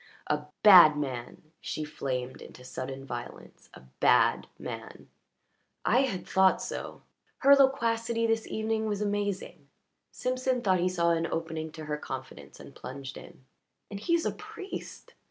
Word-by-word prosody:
"A 150 0 -1 0.2
bad 175 -7 +9
man!" 130 -5 -5 0.2
She 155 - -4
flamed 130 -3 -4
into 125 - -12
sudden 135 +1 -6
violence. 120 -2 -9
"A - - -13 0.2
bad - - +4
man!" - - -8 0.8
"I 245 - +4
had 255 -9 -1
thought 190 0 +4
so." - - -6 0.3
Her 280 +1 +7
loquacity 230 -4 +2
this 225 -1 0
evening 220 0 -1
was 205 -1 -2
amazing. 200 -7 -3 0.4
Simpson 255 0 -1
thought 185 -2 +3
he 180 +1 +2
saw 170 -2 +1
an 165 0 +1
opening 160 -1 -4
to 155 -1 -8
her 150 0 -2
confidence 130 -3 -8
and - - -12
plunged 135 0 -8
in. 130 - -13 0.5
"And 200 - -5
he 335 - +1
is 335 - 0
a - - +1
priest. 385 0 -9
185 Hz, 150 wpm, -29 LUFS, 150-225 Hz, 0.8 s, bad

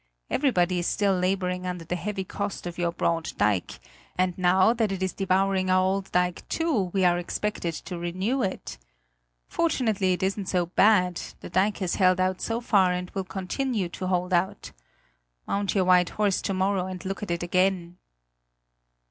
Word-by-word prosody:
Everybody 185 -10 +2
is 175 - -1
still 200 -2 +2
laboring 180 0 -1
under 180 -2 -5
the 175 - -2
heavy 195 +2 -3
cost 200 +1 -5
of 175 0 -6
your 170 -1 +1
broad 170 -1 -1
dike; 105 -3 0 0.4
and 185 -1 +1
now 185 +4 +4
that 225 -4 0
is 190 -1 -2
devouring 190 0 +1
our 185 0 +4
old 195 +1 -1
dike 180 -1 0
too 295 - 0
we 190 -1 +1
are 175 0 +3
expected 175 -2 -3
to 175 +1 -6
renew 185 +10 -1
it. 190 - -4 0.7
Fortunately 220 - +1
it 180 - -3
isn't 195 0 -1
so 180 -2 +1
bad; 180 -1 +3 0.2
the - - -9
dike 195 +4 +2
has 185 -3 -2
held 185 0 +4
out 185 0 0
so 230 0 -1
far 195 -6 +3
and 180 0 -4
will 195 - -3
continue 195 +2 -2
to 185 +2 -5
hold 180 0 0
out. 190 +3 0 0.7
Mount 200 0 -1
your 190 -2 +3
white 180 -1 +4
horse 205 -3 0
to 195 - -2
morrow 190 0 0
and 185 -1 -7
look 195 +2 -4
at 210 - -5
it 170 0 -2
again!" 180 -1 0
185 Hz, 175 wpm, -26 LUFS, 180-195 Hz, 0.7 s, now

